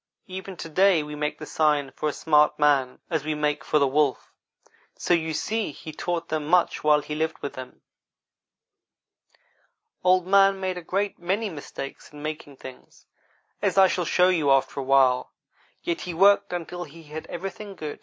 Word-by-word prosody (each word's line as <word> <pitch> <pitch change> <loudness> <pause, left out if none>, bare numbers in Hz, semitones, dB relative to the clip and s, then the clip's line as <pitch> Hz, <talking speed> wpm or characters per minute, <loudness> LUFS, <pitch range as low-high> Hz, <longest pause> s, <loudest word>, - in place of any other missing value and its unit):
Even 190 0 -8
to - - -6
day 180 0 +3
we 150 0 -8
make 150 0 -3
the 155 - -8
same - - -12
sign 150 -3 +2
for 155 - -2
a - - -4
smart 150 -1 +3
man 140 -4 +2
as 160 -4 0
we 155 0 -2
make 150 -1 -1
for 150 - +1
the 140 - +4
wolf; 140 0 0 0.6
so - - +1
you 160 -2 +1
see 215 +5 -2
he 155 - -9
taught 170 +2 -3
them 155 -1 -2
much 180 +2 +2
while 150 -1 +4
he 150 - -6
lived 160 +1 -2
with 140 - -4
them. 130 -1 -10 2.2
Old 185 0 +4
man 195 0 +4
made 185 -1 -2
a - - -10
great 195 +4 -2
many 195 +5 -1
mistakes 140 -3 -8
in 150 0 -11
making 150 -2 -6
things, 130 -1 -13 0.6
as - - 0
I 190 -1 +8
shall 180 -1 -1
show 180 +3 +4
you 160 -6 +1
after 135 +1 +2
a - - -2
while; 130 -1 +3 0.5
yet 170 - -2
he 175 -2 -5
worked 200 +2 +4
until 175 0 -5
he 165 +2 -14
had 155 +1 -8
everything 195 +3 -7
good. 155 -4 -6
160 Hz, 185 wpm, -25 LUFS, 150-185 Hz, 2.2 s, I